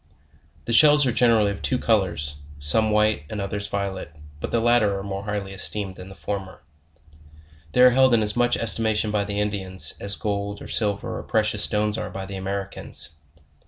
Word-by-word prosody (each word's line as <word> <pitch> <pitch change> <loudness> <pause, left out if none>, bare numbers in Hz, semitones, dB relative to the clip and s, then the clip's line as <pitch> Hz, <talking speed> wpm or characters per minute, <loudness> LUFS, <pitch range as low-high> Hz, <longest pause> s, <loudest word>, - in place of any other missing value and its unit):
The 115 - -2
shells 150 +3 +7
are 125 - +1
generally 115 -4 +3
of 100 - -8
two 130 - +1
colors, 95 - -1 0.2
some 75 +10 +4
white 105 -4 +1
and 110 - -6
others 100 +1 -3
violet; 100 -6 -5 0.2
but - - -5
the 115 - 0
latter 115 -4 +2
are 95 - -6
more 100 0 -6
highly 100 -2 -5
esteemed 95 0 +1
than 90 +1 -11
the 95 - -12
former. 95 -2 -7 1.1
They - - +3
are 125 - +7
held 130 -1 +4
in 110 - +1
.as 105 0 +2
much 120 0 +1
estimation 110 -1 +1
by 105 -1 -1
the 100 0 -4
Indians, 95 -3 0
as 100 0 -2
gold, 100 -1 -4
or - - -11
silver, 100 -3 -1
or - - -6
precious 110 -1 0
stones 105 +1 0
are - - -5
by 95 0 -7
the 100 0 -8
Americans. 95 -5 -4
105 Hz, 190 wpm, -23 LUFS, 100-110 Hz, 1.1 s, shells